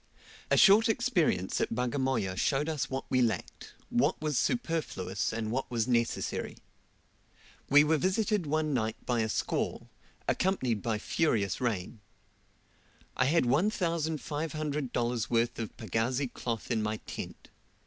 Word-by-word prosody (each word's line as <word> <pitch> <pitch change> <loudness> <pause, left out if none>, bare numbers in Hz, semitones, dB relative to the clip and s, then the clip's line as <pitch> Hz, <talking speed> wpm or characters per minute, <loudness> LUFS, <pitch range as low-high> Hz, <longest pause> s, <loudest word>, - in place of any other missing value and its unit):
A - - +4
short 215 +3 +7
experience 220 - +1
at - - -1
Bagamoya 125 -5 0
showed 140 - +1
us 155 -4 -2
what 135 0 -3
we 130 - +3
lacked, 110 -6 -2 0.2
what - - +2
was 150 -2 -1
superfluous, 155 - -1
and 110 -1 -3
what 130 +3 -2
was 115 -1 0
necessary. 115 -2 -1 1.1
We 145 +1 +7
were 155 0 +2
visited 195 - +1
one 155 0 0
night 110 -3 0
by 120 -2 +1
a 110 -1 0
squall, - - -2 0.4
accompanied 130 - +1
by 115 -2 -1
furious 105 - 0
rain. 110 -3 -2 1.2
I 130 - +2
had 160 +4 +3
$1,500 150 - -1
worth 120 0 +1
of 115 - -5
pagazi 120 +4 -1
cloth 115 -1 -4
in 115 -2 +1
my 105 0 -1
tent. - - -8
130 Hz, 130 wpm, -30 LUFS, 115-155 Hz, 1.2 s, short